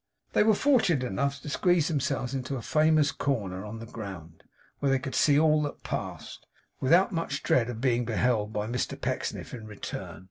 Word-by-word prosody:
They - - +4
were 220 0 +4
fortunate 195 - +3
enough 135 +5 -1
to 150 - -7
squeeze 175 +1 +2
themselves 135 -4 -1
into 135 +1 -3
a 120 - -5
famous 155 -1 +3
corner 100 -11 -2
on 105 +2 -7
the 115 - -8
ground, 95 -8 -9 0.4
where 140 - +1
they 135 - +4
could 130 0 -6
see 145 -2 +4
all 155 -1 +4
that 145 -1 -5
passed, - - -6 0.3
without 170 +10 +4
much 165 -5 -3
dread 125 -2 +2
of 115 -2 -5
being 125 -2 +2
beheld 110 -3 +1
by 105 -1 -2
Mr 120 +2 -3
Pecksniff - - -3
in 110 -3 -7
return. 105 -2 -7
130 Hz, 185 wpm, -28 LUFS, 115-155 Hz, 0.4 s, They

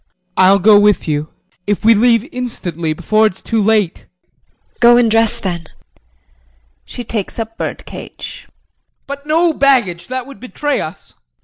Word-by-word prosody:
JEAN. 180 0 -49
I'll 195 +2 +6
go 205 +2 +6
with 205 -3 +2
you 150 0 -2 0.4
if 205 +1 -1
we 230 - +7
leave 230 +2 +3
instantly 175 - -4
before 215 +7 +2
it's 185 - -6
too 225 -2 0
late. 210 -4 0
JULIE. 180 - -44
Go 240 0 +6
and 235 -2 +3
dress 225 0 +2
then. 170 -4 -4 1.2
[She 245 - -8
takes 215 -3 -4
up 225 -1 -5
bird - - -5
cage.] - - -9
JEAN. - - -34 0.6
But 280 +1 -8
no 330 +2 +2
baggage! 245 - +1
That 255 -1 -4
would 275 0 -13
betray 285 +3 -2
us. 160 +5 -9
220 Hz, 165 wpm, -16 LUFS, 185-245 Hz, 1.2 s, we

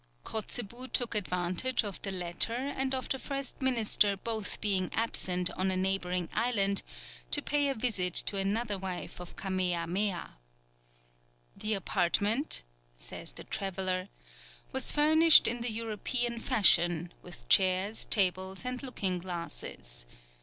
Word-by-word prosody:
Kotzebue 235 +3 -3
took 240 -2 0
advantage 185 +5 0
of 200 -3 -7
the 200 - -4
latter 180 +4 -1
and 265 +1 -2
of 260 - -4
the 265 - -2
first 275 0 -6
minister 220 -5 +2
both 220 +1 -3
being 190 -4 0
absent 180 -5 +1
on 190 +1 -2
a 185 - +1
neighbouring 180 -2 -1
island, 205 -4 +1 0.5
to - - +5
pay 290 0 0
a 270 - -2
visit 200 -7 0
to 200 - +4
another 205 +1 -1
wife 185 -2 -6
of 180 -1 -10
Kamea 185 -3 -1
Mea. 190 0 -1 1.3
"The 215 0 -1
apartment," 205 - 0 0.3
says - - -6
the - - -8
traveller, 185 -1 -3 0.6
"was 265 0 +3
furnished 315 +2 +6
in 240 +1 +1
the 240 - 0
European 230 +2 -2
fashion, 175 - +4
with 160 -10 -13
chairs, 190 - +3
tables, 190 0 +3
and 250 0 -4
looking 195 -9 -2
glasses. 170 - -5
200 Hz, 130 wpm, -30 LUFS, 185-240 Hz, 1.3 s, furnished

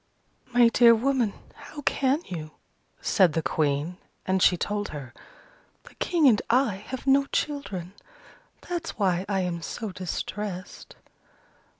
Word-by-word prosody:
"My 240 -1 +6
dear 235 0 +6
woman, 245 -3 +1 0.2
how 290 0 -11
can 275 +5 +1
you?" 155 -4 -7 0.5
said 185 -6 +3
the 165 - -1
Queen: 150 +3 0 0.3
and 190 -1 +1
she 180 - +5
told 205 +3 -2
her, 135 -5 -8 0.7
"The - - -16
King 330 -5 +2
and 220 -5 +5
I 240 -5 +3
have 260 0 -6
no 275 0 +4
children: 200 - -3 0.7
that's 345 -2 -4
why 185 -3 +1
I 195 -2 +1
am 175 -2 -3
so 215 +5 -5
distressed." 185 +1 -6
205 Hz, 130 wpm, -26 LUFS, 180-260 Hz, 0.7 s, My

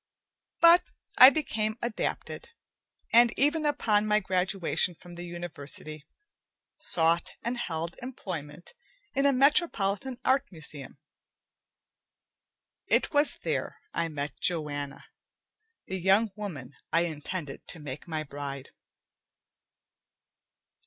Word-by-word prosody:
But 340 +1 +8 0.4
I 255 - +13
became 220 -8 -2
adapted, 240 - -4 0.6
and 235 0 +7
even 295 +3 +2
upon 215 -8 +2
my 210 0 +4
graduation 185 -2 0
from 175 +2 -14
the 175 0 -7
university, 155 -3 -6 0.7
sought 165 0 +1
and 240 +1 -1
held 170 -7 -4
employment 175 - -7 0.4
in 275 +1 +3
a - - +5
metropolitan 260 - +2
art 270 -1 +2
museum. 150 -5 -6 1.9
It - - +2
was 290 +1 +4
there - - -2 0.2
I 170 0 0
met 145 -3 -5
Joanna, 145 -5 -2 0.8
the 190 0 -4
young 195 +4 +3
woman 155 - -7 0.2
I 165 +2 +3
intended 160 -1 -5
to 170 - -5
make 145 0 -7
my 155 -2 -3
bride. 140 -2 -7
180 Hz, 105 wpm, -28 LUFS, 155-235 Hz, 1.9 s, I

